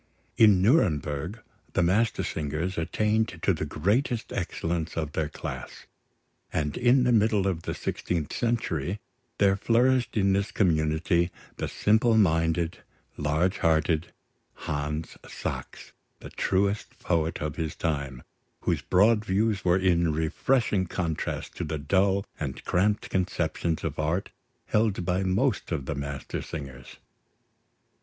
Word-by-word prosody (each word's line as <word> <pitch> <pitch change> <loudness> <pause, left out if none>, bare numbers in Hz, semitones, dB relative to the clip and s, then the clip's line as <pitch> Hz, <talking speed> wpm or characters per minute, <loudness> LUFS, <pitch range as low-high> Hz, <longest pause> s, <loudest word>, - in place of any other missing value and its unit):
In 105 -5 +6
Nuremberg, 90 - +1 0.3
the - - +2
Mastersingers 90 -4 0
attained 105 +7 0
to 95 - +4
the 80 -2 -3
greatest 110 - 0
excellence 80 -1 -3
of 75 -2 -2
their 75 0 -1
class; - - -7 0.7
and 75 -2 -1
in 125 +1 +4
the 125 - +3
middle 105 -3 +3
of 90 -4 0
the - - -4
sixteenth 80 -4 -3
century 105 - -1 0.4
there 100 -1 +4
flourished 120 +4 +2
in 100 -1 +3
this 100 +1 0
community, 80 -1 +2 0.3
the - - -2
simple 110 +2 +3
minded, 80 -3 +2 0.4
large 80 +6 0
hearted 80 0 +1 0.5
Hans 75 +1 -3
Sachs, - - -6 0.3
the - - -10
truest 100 +2 0
poet 80 -1 0
of 75 +1 -4
his 80 0 -3
time, 70 -6 -3 0.4
whose - - 0
broad 105 +4 +4
views 105 0 +1
were 90 0 +4
in 85 -3 +2
refreshing 100 - +1
contrast 85 -3 -3
to - - -2
the 80 - -3
dull 95 +6 +2
and 70 -4 -5
cramped 100 +4 +1
conceptions 85 -3 -1
of - - -3
art 80 +6 -1 0.3
held 105 -5 +1
by 90 +1 +1
most 95 0 0
of 70 - -2
the 75 - -2
Mastersingers. 70 -1 -6
90 Hz, 125 wpm, -27 LUFS, 80-105 Hz, 0.7 s, In